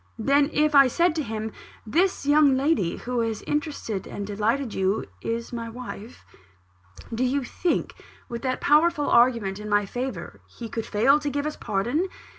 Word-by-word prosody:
Then 280 +5 +3
if 305 0 +2
I 275 -2 +8
said 340 +6 +2
to 320 - 0
him, 220 -2 -4 0.3
'This 350 - +1
young 290 -2 +5
lady, 270 - +1
who 250 0 -3
has 225 -2 -1
so - - -12
interested 295 - -3
and 200 - -5
delighted 220 +5 -1
you, 190 +2 0 0.2
is 230 - -4
my 230 -1 -4
wife;' 230 - -9 0.9
do 235 +3 0
you 265 +2 +1
think, 340 +7 -1 0.3
with 235 -1 -6
that 255 -1 -2
powerful 300 0 +3
argument 230 -5 +3
in 210 0 -7
my 205 0 +2
favour, 250 +6 -5
he 230 -2 -9
could 225 +1 -4
fail 270 +8 +4
to 295 -1 -2
give 285 +1 -2
us 305 - -2
his - - -15
pardon? 240 - -1
250 Hz, 180 wpm, -25 LUFS, 220-290 Hz, 0.9 s, I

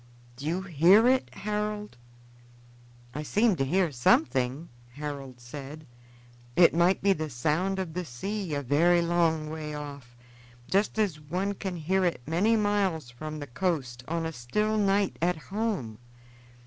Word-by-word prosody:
Do 140 +4 -7
you 180 +4 -1
hear 185 - +5
it, 260 0 +2
Harold?" 210 -3 -3 1.2
"I 150 - -4
seem 210 +7 +2
to 135 - +1
hear 175 +4 +1
something," 135 - +2 0.2
Harold 140 -3 -6
said. 140 +5 -9 0.7
"It 175 - +6
might 175 +3 +3
be 200 -1 +5
the 155 -3 -4
sound 155 +10 0
of 185 -4 -3
the 180 +2 -2
sea 180 - -4
a 145 - -2
very 170 +6 +3
long 165 -3 +1
way 155 -1 -5
off, 140 -5 -8 0.5
just 200 +3 +1
as 200 -8 0
one 180 +7 -2
can 190 -2 -5
hear 185 +4 0
it 175 -6 +1
many 185 +9 +2
miles 200 - 0
from 155 +5 -7
the 145 - -5
coast, 130 -4 -2
on 165 0 -2
a 160 - -2
still 210 - -1
night 200 -1 +2
at 175 0 +1
home. 185 - -3
165 Hz, 150 wpm, -28 LUFS, 145-195 Hz, 1.2 s, It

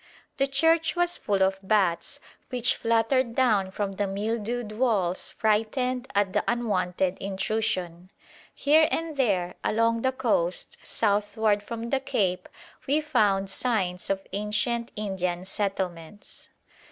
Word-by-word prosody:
The 275 - +2
church 325 +5 +2
was 350 0 +1
full 200 -2 +1
of 190 0 +1
bats, 190 -4 +1 0.3
which 250 -1 +1
fluttered 230 +2 +1
down 215 -7 +3
from 200 +1 -3
the 200 +1 -2
mildewed 220 +3 -2
walls 210 -6 0
frightened 245 +4 0
at 200 -2 +2
the - - +1
unwonted 190 -5 0
intrusion. 190 -3 -2 0.4
Here 310 +2 +4
and 325 -1 -2
there 195 -10 +1
along 230 +1 +2
the 260 - +2
coast 220 -9 -1
southward 205 0 +1
from 230 +2 -6
the 270 - +2
cape 205 -9 -1 0.4
we 290 +3 +3
found 210 -10 +2
signs 190 -8 -1
of 195 0 -1
ancient 215 +3 -1
Indian 185 -4 -2
settlements. 190 -2 -5
210 Hz, 125 wpm, -26 LUFS, 190-245 Hz, 0.4 s, Here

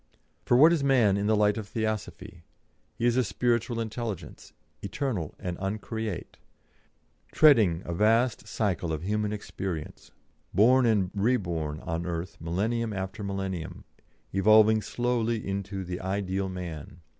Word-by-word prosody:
For 120 - +4
what 160 +6 +7
is 155 -5 0
man 125 -8 +4
in 100 +1 -1
the 110 - +3
light 105 +1 +3
of 110 -2 -5
Theosophy? 110 -3 -4 0.6
He 120 - -1
is 120 0 +3
a 130 - +4
spiritual 120 +1 0
intelligence, 115 -3 -5 0.3
eternal 100 - -3
and 90 -1 -5
uncreate, 105 0 -4 0.9
treading 110 - +5
a 85 - -3
vast 115 +6 +2
cycle 95 -6 -1
of 80 +1 -4
human 105 +2 -1
experience, 95 -6 -6 0.5
born 125 +5 +5
and 100 -5 +2
reborn 85 -9 -1
on 85 +1 -3
earth 85 0 -4
millennium 110 +7 -1
after 95 +2 -5
millennium, 95 -4 -4 0.5
evolving 110 +2 +5
slowly 120 0 -1
into 100 0 -3
the 90 +1 -5
ideal 95 0 -2
man. 85 -3 -7
105 Hz, 135 wpm, -27 LUFS, 90-115 Hz, 0.9 s, what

